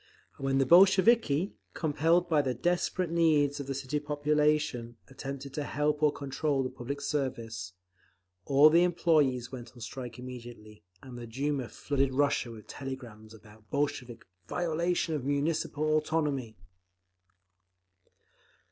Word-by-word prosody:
And 135 - -7
when 135 0 +2
the 135 - +3
Bolsheviki, 190 - +5 0.2
compelled 165 +3 +2
by 155 -3 +3
the 130 -3 -2
desperate 175 +4 0
needs 150 -4 +3
of 140 - -5
the 135 - -3
city 140 +2 -2
population, 150 -4 0
attempted 135 0 -7
to 150 - -2
help 150 +1 -1
or 150 -1 +4
to - - -12
control 140 0 -1
the 130 - -4
public 140 +4 -5
service, 115 - -3 0.7
all 145 +3 +6
the 170 +2 +5
employees 150 -8 +2
went 125 -2 -9
on 125 - -15
strike 120 +1 -7
immediately, 120 -4 -10 0.2
and 125 -2 -9
the 120 - -8
Duma 135 +1 -2
flooded 135 -2 -1
Russia 140 -3 +1
with 110 -2 -11
telegrams 120 -6 -8
about 110 -1 -17
Bolshevik 140 -5 -2 0.2
"violation 170 0 -1
of 145 -4 -2
Municipal 150 +2 -1
autonomy." 150 -7 -1
140 Hz, 135 wpm, -30 LUFS, 125-155 Hz, 0.7 s, all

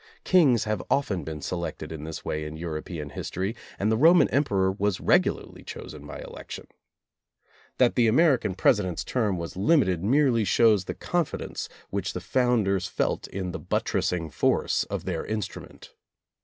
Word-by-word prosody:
Kings 145 - +4
have 110 -3 -2
often 100 - 0
been 75 -1 -6
selected 85 -2 -4
in 80 -1 -6
this 80 0 -7
way 75 0 -2
in 75 +1 -6
European 80 -2 -5
history, 95 - -3 0.2
and 105 +2 +1
the 110 - +2
Roman 165 +7 +6
Emperor 100 -9 +2
was 100 0 -1
regularly - - +1
chosen 75 -1 -9
by - - -7
election. - - -9 1.1
That 125 -2 +4
the 120 -2 +3
American 130 - +3
President's 90 -2 +2
term 105 -7 0
was 85 0 -6
limited 95 - +2
merely 125 0 +3
shows 105 -1 +4
the - - -5
confidence 175 -4 -3 0.2
which - - -2
the - - -3
founders 110 -7 +1
felt - - -1
in 95 -2 -4
the 95 - -5
buttressing 90 -4 -1
force - - +1
of - - -5
their - - -2
instrument. 110 -3 -6
100 Hz, 155 wpm, -26 LUFS, 85-120 Hz, 1.1 s, Roman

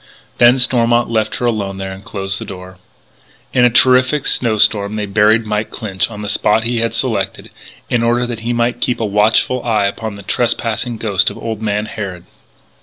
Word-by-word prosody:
Then 120 +2 +6
Stormont 120 -2 +2
left 110 -1 0
her 125 - -3
alone 100 -5 -1
there 95 0 -5
and 95 +1 -10
closed 95 -2 -4
the - - -6
door. 95 -1 -10 0.7
In 125 - +3
a - - +5
terrific 130 +4 +3
snow 115 -3 +1
storm 105 0 +2
they 105 -1 -2
buried 105 +3 +3
Mike 105 0 -2
Clinch 100 -4 -3
on 105 -2 -8
the - - -4
spot 105 +2 +1
he 120 0 -1
had 115 0 -1
selected, - - -2 0.4
in 120 - 0
order 120 +1 +1
that 120 -2 -5
he 115 +2 -3
might 120 0 -1
keep 125 - 0
a 115 - 0
watchful 110 +4 +2
eye 110 -4 +1
upon 100 +1 -3
the 100 - -11
trespassing 120 +2 -1
ghost 105 -2 +1
of - - -9
old 110 -2 -5
man 105 -1 -1
Harrod. 100 -6 -6
110 Hz, 195 wpm, -16 LUFS, 100-120 Hz, 0.7 s, Then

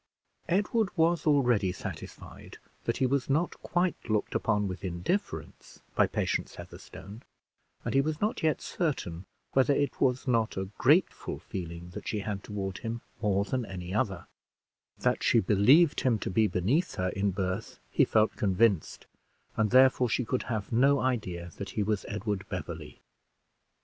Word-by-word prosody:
Edward 205 +3 +2
was 165 0 +2
already 120 -10 +3
satisfied 90 - -9 0.3
that - - 0
he 130 - +2
was 135 +1 0
not 160 +5 +2
quite 175 -7 -1
looked 105 -1 0
upon 105 -2 +1
with 90 -1 -6
indifference 85 - -4
by - - +4
Patience - - -2
Heatherstone; 105 +4 -11 0.6
and - - -1
he 135 - +5
was 155 +2 -2
not 210 +2 -1
yet 155 -2 +1
certain 95 - -3 0.3
whether 135 +1 +4
it 145 -2 -1
was 130 +1 +1
not 115 -5 +1
a 95 0 -3
grateful - - +2
feeling 85 -1 -7
that - - -8
she 105 - -1
had 100 -1 -4
toward 95 -2 -4
him 115 0 -4 0.2
more 100 -2 +1
than 125 +3 -1
any 95 -3 -6
other; 95 -4 -1 0.7
that - - 0
she - - +4
believed 125 - +5
him 125 -4 +2
to - - -4
be 110 +3 +3
beneath 105 - 0
her 90 0 0
in 95 +2 0
birth, 95 -1 -3
he - - +4
felt 110 0 +2
convinced, 100 -3 +1 0.5
and 110 -1 +2
therefore 130 0 +5
she 125 +3 0
could 125 +3 -1
have 110 -4 -3
no 135 +4 +4
idea 95 -10 -2
that 100 - -5
he 105 - +2
was 105 0 -1
Edward 105 -1 -3
Beverley. - - -7
110 Hz, 160 wpm, -29 LUFS, 95-135 Hz, 0.7 s, he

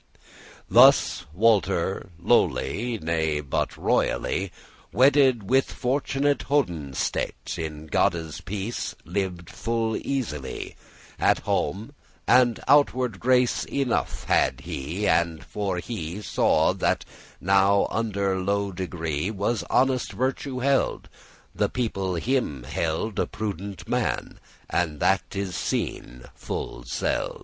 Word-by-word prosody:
Thus 125 - +5
Walter 95 -1 +1
lowly, 115 +6 +1
— - - -18
nay, 80 -2 0
but 70 -2 -2
royally, 95 0 0 0.4
Wedded 130 -5 +4
with 130 +1 +3
fortn'ate 140 +2 0
honestete,* 85 - 0
*virtue - - -4
In 75 -1 -6
Godde's 80 +1 0
peace 100 +5 -4
lived 90 -4 -3
full 115 -1 -1
easily 90 - -4 0.4
At - - +3
home, 110 +9 -2 0.3
and 125 -3 +5
outward 130 -7 +3
grace 125 0 +3
enough 135 -4 -1
had - - +2
he: 85 +10 -3
And, 80 -1 +1
for 100 -3 -2
he 90 -2 -5
saw - - +2
that - - 0 0.4
under 100 0 +2
low 100 +1 0
degree 85 -3 -3
Was 105 +2 -1
honest 130 -1 +2
virtue 130 0 -2
hid, 135 +1 +1 0.4
the - - 0
people 95 -7 -2
him 85 - -1
held 80 - -2
A - - +1
prudent 100 -3 -5
man, - - -2 0.3
and 80 -4 -1
that 95 0 +3
is 95 -3 -3
seen 60 -6 -3
full - - -5
seld'. - - -2
100 Hz, 110 wpm, -25 LUFS, 85-125 Hz, 0.4 s, Thus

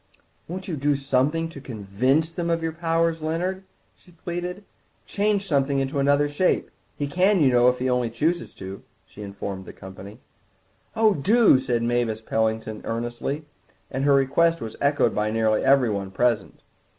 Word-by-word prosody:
"Won't 185 +3 -6
you 175 - -2
do 145 +1 +1
something 140 +4 0
to 145 -4 -10
convince 130 +7 0
them 170 0 -3
of 165 -1 0
your 165 - -1
powers, 165 0 0
Leonard?" 180 +5 -2 0.3
she - - -24
pleaded; 175 +3 -5 0.4
"change 205 -1 0
something 140 -3 +1
into 135 +1 -1
another 145 +1 +3
shape. 145 +6 0 0.3
He 145 - -1
can, 185 +7 +2
you 140 -5 +4
know, 125 0 +5
if 125 - -1
he 130 - -2
only 125 -2 +1
chooses 165 +9 -1
to," 95 +1 -8 0.2
she 105 - -13
informed 100 -1 -6
the - - -10
company. 95 +4 -11 0.8
"Oh, 220 -1 +4
do," 200 - +4
said 120 -3 -1
Mavis 120 -2 0
Pellington 110 -1 -1
earnestly, 120 +6 -4 0.5
and 130 - -2
her 140 0 +5
request 165 +5 +2
was 110 -1 -7
echoed 145 +1 +2
by 105 0 0
nearly 110 0 +1
everyone 120 -8 +2
present. 110 +1 -1
140 Hz, 160 wpm, -24 LUFS, 115-165 Hz, 0.8 s, know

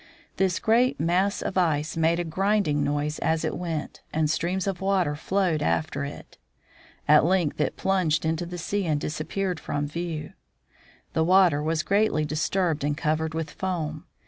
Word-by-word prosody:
This 190 -2 +2
great 240 +3 +2
mass 180 +5 +1
of 190 - 0
ice 160 -3 0
made 165 +1 +2
a - - 0
grinding 185 -3 +1
noise 145 +1 -1
as 160 0 0
it - - -2
went, 165 -3 -4
and 155 -1 +1
streams 180 +4 -1
of 195 -2 -3
water 190 -6 +1
flowed 180 0 0
after 85 -1 0
it. - - -9 0.7
At 150 0 +7
length 170 -3 +1
it - - -1
plunged 175 -5 +1
into 160 +2 -1
the 175 0 -6
sea 195 +2 -2
and 150 -2 +1
disappeared 165 +4 -3
from 145 0 -2
view. 160 -1 -5 0.8
The 160 - +2
water 180 -4 +4
was 155 +1 0
greatly 200 -6 +2
disturbed 160 +1 0
and 145 0 0
covered 160 0 -1
with 160 -1 -3
foam. 160 -5 -3
165 Hz, 165 wpm, -26 LUFS, 155-185 Hz, 0.8 s, At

